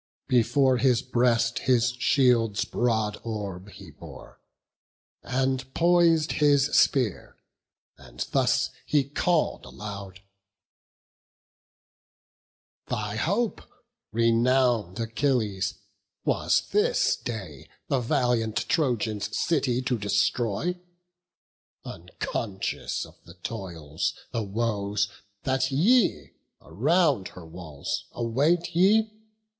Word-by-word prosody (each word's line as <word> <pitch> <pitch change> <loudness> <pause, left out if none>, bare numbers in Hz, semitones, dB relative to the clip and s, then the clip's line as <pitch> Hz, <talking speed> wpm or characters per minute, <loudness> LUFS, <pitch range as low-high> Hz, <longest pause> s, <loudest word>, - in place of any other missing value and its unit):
Before 130 +2 +3
his 125 -2 +2
breast 120 -2 +1
his 125 -1 +4
shield's 120 -7 +3
broad 110 -3 -1
orb 100 -4 -5
he - - -12
bore, - - -13 0.8
And 130 0 -1
pois'd 170 -2 +4
his 145 -1 +3
spear, 125 - +1 0.6
as - - -6
thus - - +1 0.2
he 145 -2 +3
call'd 155 +4 0
aloud: 100 -2 -8 2.7
"Thy 105 -1 -3
hope, 200 - 0 0.5
renown'd 115 -3 +2
Achilles, 115 -5 -1 0.5
was - - +1
this - - +2
day 95 - -7 0.2
The 135 - +1
valiant 115 -2 0
Trojans' 115 - 0
city 130 -6 +1
to 125 -3 -1
destroy; 105 - 0 1.1
Unconscious 100 -4 -4
of - - -19
the 85 - -14
toils, 85 -6 -4 0.2
the 115 - -2
woes, 100 -1 -1 0.3
that 130 0 0
ye 165 - +2 0.3
Around 140 - +1
her 90 - -12
walls 80 -4 -6
await 150 +9 0
ye! 215 +5 +4
120 Hz, 90 wpm, -26 LUFS, 105-135 Hz, 2.7 s, his